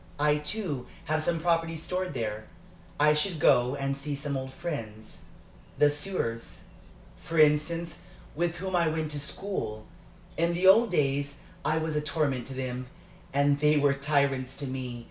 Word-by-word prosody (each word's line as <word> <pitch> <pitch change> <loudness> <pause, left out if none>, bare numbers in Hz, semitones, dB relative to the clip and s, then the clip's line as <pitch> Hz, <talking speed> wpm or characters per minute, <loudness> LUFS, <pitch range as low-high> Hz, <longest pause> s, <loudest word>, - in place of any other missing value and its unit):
I, 150 0 +3
too, 150 - -3 0.2
have 155 0 0
some 165 +1 0
property 165 0 +1
stored 180 0 -2
there. 110 -2 -3 0.5
I 150 +1 +6
should 155 +2 0
go 125 -2 +4
and 135 -1 -1
see 140 +1 -3
some 140 0 -3
old 130 0 -4
friends 115 -10 -6 0.5
the 145 0 +5
soeurs, 145 -7 -3 0.6
for 165 - -5
instance, 155 +2 +3 0.4
with 170 +2 0
whom 185 +1 -3
I 170 -2 +3
went 155 -1 -1
to 145 - -4
school. 145 - -3 0.5
In 170 +1 +1
the 180 +2 0
old 220 +5 +7
days 145 -4 0 0.3
I 155 - +1
was 160 -1 -1
a 150 - +1
torment 150 -5 -1
to 135 - -7
them, 130 -1 -4 0.4
and 140 +1 +3
they 150 +1 +4
were 145 -1 +4
tyrants 140 -2 0
to 145 - -4
me. 130 -2 -5
150 Hz, 165 wpm, -28 LUFS, 135-165 Hz, 0.6 s, old